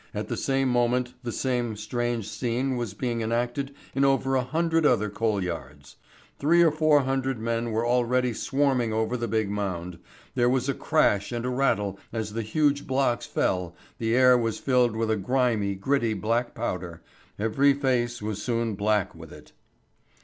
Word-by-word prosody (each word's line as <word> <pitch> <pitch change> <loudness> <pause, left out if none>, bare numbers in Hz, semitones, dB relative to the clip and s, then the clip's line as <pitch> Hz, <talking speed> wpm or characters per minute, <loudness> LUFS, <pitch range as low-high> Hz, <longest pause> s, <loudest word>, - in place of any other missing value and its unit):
At - - -4
the - - -1
same 135 0 0
moment 125 0 +1
the 120 -2 -4
same 120 -3 -1
strange 120 +1 -2
scene 125 +4 -1
was 120 -5 -4
being 120 0 -2
enacted 120 +4 -1 0.2
in 135 - +1
over 135 -1 +2
a 130 - +3
hundred 165 +5 0
other 105 -8 +2
coal 105 -2 0
yards. 75 -5 -7 0.4
Three 170 +4 +4
or 165 - +5
four 155 -1 +4
hundred 135 -1 -1
men 115 +1 -2
were 115 +1 0
already 125 0 +1
swarming 135 -2 0
over 110 +2 0
the 120 -1 -2
big 110 -2 0
mound, 90 -4 -4 0.3
there 120 -1 +2
was 130 0 +1
a 140 - +1
crash 115 -12 +1
and 120 0 -3
a - - 0
rattle 105 -7 0
as 110 -2 -4
the 115 - -2
huge 145 +5 +1
blocks 130 -2 0
fell, 90 -2 -1 0.2
the 115 0 +1
air 125 0 +6
was 115 -3 0
filled 125 -4 +2
with 110 0 0
a 110 - +1
grimy, 110 -2 0
gritty 115 +2 0
black 115 +4 -1
powder, 90 -7 -4 0.3
every 135 +7 +3
face 120 -4 0
was 105 -1 -3
soon 115 -1 -1
black 105 -1 0
with - - -12
it. - - -14
120 Hz, 175 wpm, -26 LUFS, 110-130 Hz, 0.4 s, air